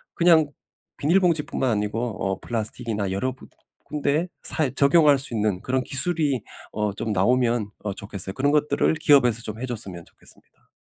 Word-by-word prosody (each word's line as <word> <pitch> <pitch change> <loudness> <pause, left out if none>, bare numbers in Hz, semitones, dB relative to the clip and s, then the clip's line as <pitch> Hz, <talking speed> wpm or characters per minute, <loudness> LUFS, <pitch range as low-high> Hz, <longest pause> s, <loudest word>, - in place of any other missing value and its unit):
그냥 165 -3 +4 0.5
비닐봉지뿐만 165 -5 +1
아니고 105 +1 -1 0.3
어 95 -1 -2
플라스틱이나 110 -3 -3
여러 125 +7 -2
군 130 - -16 0.4
군데에 150 +3 -1 0.2
사용 150 -6 0
적용할 145 0 +5
수 130 -2 -2
있는 105 -4 0
그런 130 0 -1
기술이 140 -1 +3 0.3
어 105 -1 -2
좀 110 +2 -4
나오면 115 +2 +1
어 105 -2 -3
좋겠어요. 100 -1 -4
그런 140 +6 +1
것들을 150 +1 +2
기업에서 125 -7 +3
좀 110 -1 -6
해 - - -2
줬으면 95 -8 -4
좋겠습니다. - - -14
125 Hz, 365 characters per minute, -23 LUFS, 105-145 Hz, 0.5 s, 적용할